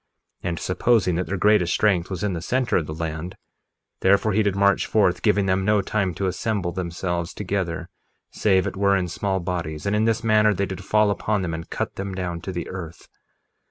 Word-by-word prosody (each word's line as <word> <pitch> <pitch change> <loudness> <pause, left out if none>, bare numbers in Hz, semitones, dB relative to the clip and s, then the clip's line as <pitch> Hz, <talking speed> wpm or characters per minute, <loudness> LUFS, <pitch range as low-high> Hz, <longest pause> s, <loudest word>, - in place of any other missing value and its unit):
1:24 - - -1
And, 85 - -3
supposing 95 0 +2
that 90 - -2
their 100 - -2
greatest 95 -2 +3
strength 95 -5 +2
was 95 0 -4
in 105 -2 0
the 85 - -4
center 125 +6 0
of 80 - +1
the 75 - -5
land, 80 +2 -4 0.6
therefore 100 +2 +3
he 110 - +3
did 100 -2 +1
march 100 0 +3
forth, 95 -5 +2
giving 105 -2 +2
them 95 0 +1
no 105 0 +2
time 95 -4 -1
to 95 - -2
assemble 95 -1 -1
themselves 85 -1 -3
together 90 -4 -2 0.4
save 95 -3 +2
it - - -3
were 100 0 +3
in 90 -1 -1
small 95 +2 -1
bodies; 85 -4 -4
and 100 +1 +1
in 110 +1 +2
this 115 +1 +1
manner 110 -2 +4
they 100 - 0
did 95 0 -7
fall 105 +1 +3
upon 100 0 -1
them 85 -2 -2
and 80 0 -6
cut - - -4
them 95 -1 -4
down 90 -2 -3
to 95 - -5
the 85 -1 -4
earth. 85 -3 -8
95 Hz, 215 wpm, -23 LUFS, 85-105 Hz, 0.6 s, manner